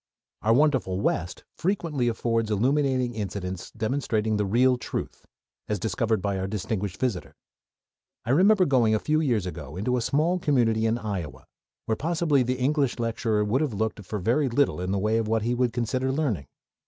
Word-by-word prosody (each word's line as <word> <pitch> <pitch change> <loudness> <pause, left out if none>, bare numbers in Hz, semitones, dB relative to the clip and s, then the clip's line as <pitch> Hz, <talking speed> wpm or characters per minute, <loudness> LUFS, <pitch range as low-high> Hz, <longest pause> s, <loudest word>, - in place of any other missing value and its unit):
Our 110 +1 +3
wonderful 130 -10 +2
West 90 -3 -1
frequently 165 -8 -1
affords 115 -1 0
illuminating 130 +3 +1
incidents 95 -4 -5
demonstrating 110 -2 -1
the 105 -1 0
real 125 +4 +3
truth, 115 - -6 0.4
as 105 - -1
discovered 110 +1 -1
by 100 -1 -1
our 95 - -2
distinguished 100 -1 -3
visitor. 120 -9 -2 0.9
I 120 - 0
remember 190 +6 +5
going 120 -7 +3
a - - +1
few 155 +5 +1
years 120 - +1
ago 75 -4 -7
into 125 +6 0
a - - 0
small 155 +9 +1
community 115 -8 +2
in 115 +1 +1
Iowa, 100 - -5 0.4
where 110 - 0
possibly 160 -1 +1
the 125 +1 0
English 135 0 +1
lecturer 115 -2 0
would 120 +7 +1
have 140 -9 -1
looked 110 0 -2
for 105 +3 -4
very 120 +9 +1
little 125 -6 +1
in 90 - -3
the 100 - +1
way 110 +3 +1
of 110 - -2
what 110 0 +1
he 120 +2 0
would 125 -1 +1
consider 130 +2 -1
learning. 135 - -1
115 Hz, 180 wpm, -26 LUFS, 105-135 Hz, 0.9 s, remember